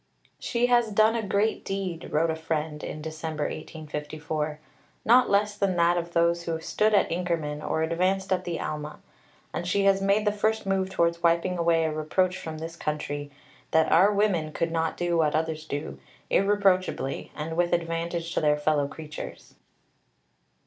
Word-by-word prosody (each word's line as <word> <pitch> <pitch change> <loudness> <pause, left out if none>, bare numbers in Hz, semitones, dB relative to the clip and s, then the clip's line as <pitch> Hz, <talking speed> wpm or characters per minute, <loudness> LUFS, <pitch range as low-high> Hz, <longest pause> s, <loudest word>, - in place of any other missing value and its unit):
"She 240 0 0
has 240 -2 +3
done 215 +2 +4
a 230 - 0
great 205 +1 0
deed," 190 -4 -4
wrote 160 +2 +2
a - - -2
friend 155 -1 -3
in 155 - -6
December 155 -1 -4
1854, 155 0 -4 0.5
"not 245 +3 +6
less 205 +1 +2
than 200 -3 0
that 170 0 +3
of 170 0 -3
those 170 0 +2
who 165 -1 -2
stood 210 +6 +1
at 200 - +3
Inkerman 165 -4 -2
or 160 - -1
advanced 185 +4 +1
at 185 - -1
the 170 -2 -3
Alma; 150 0 -4 0.6
and 175 - -3
she 200 +2 +2
has 195 0 +4
made 200 +2 +2
the 210 - +3
first 220 +1 0
move 190 -1 0
towards 170 -2 +1
wiping 170 +2 +2
away 165 -1 +3
a 160 -1 0
reproach 180 +4 0
from 160 -1 -6
this 165 +1 -6
country 145 -2 -3 0.4
that 160 0 +3
our 185 +6 +6
women 200 -7 +1
could 165 +2 -1
not 165 -1 -1
do 175 -1 0
what 150 -2 +2
others 160 0 -2
do, 105 - -5 0.3
irreproachably, 195 -8 +1
and 160 +2 -4
with 175 0 +1
advantage 170 0 -2
to - - 0
their 150 -1 +3
fellow 150 -1 +1
creatures." 155 0 -9
170 Hz, 170 wpm, -27 LUFS, 155-195 Hz, 0.6 s, not